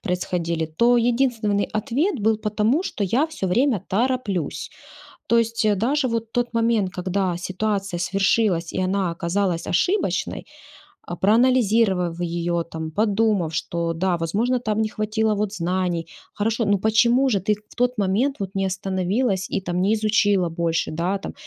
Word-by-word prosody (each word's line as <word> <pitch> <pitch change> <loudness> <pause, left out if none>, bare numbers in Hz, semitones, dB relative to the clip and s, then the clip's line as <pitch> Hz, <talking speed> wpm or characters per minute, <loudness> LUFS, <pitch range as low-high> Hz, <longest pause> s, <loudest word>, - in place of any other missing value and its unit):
происходили,- 170 -2 -2
то 240 +1 +5
единственный 235 -4 +1
ответ 255 - -1
был: 220 +1 +2
"Потому 215 - 0
что 210 - -4
я 240 - +2
всё 310 - -4
время 235 0 +2
тороплюсь". 210 - -1 0.6
То 235 - +3
есть 230 -1 +1
даже 260 +5 +1
вот 230 -1 -3
тот 245 -1 -1
момент, 230 -4 +1
когда 185 -1 -1
ситуация 195 0 -2
свершилась, 195 -1 +1
и 185 - -1
она 185 -1 0
оказалась 170 +1 -1
ошибочной, 360 - 0 0.6
а, 175 - -4
проанализировав 215 -5 +2
её, 170 0 -1
там, 160 -1 -6
подумав, 205 -3 +1
что, 170 +1 -2
да, 180 +2 0
возможно, 220 +10 0
там 220 -2 -1
не 215 - 0
хватило 215 0 0
вот 210 0 -2
знаний. 175 -2 -1 0.3
Хорошо, 225 +2 0
но 200 -1 +2
почему 235 +5 +3
же 205 - +1
ты 210 +2 +1 0.2
в - - -17
тот 245 -2 0
момент 220 +9 +1
вот 195 -1 -5
не 195 0 0
остановилась 190 +2 -1
и, - - -2
там, 180 -1 -2
не 200 +3 +2
изучила 205 -4 +2
больше, 165 0 -1
да, 175 +5 -1
там? - - -7
205 Hz, 155 wpm, -23 LUFS, 180-230 Hz, 0.6 s, то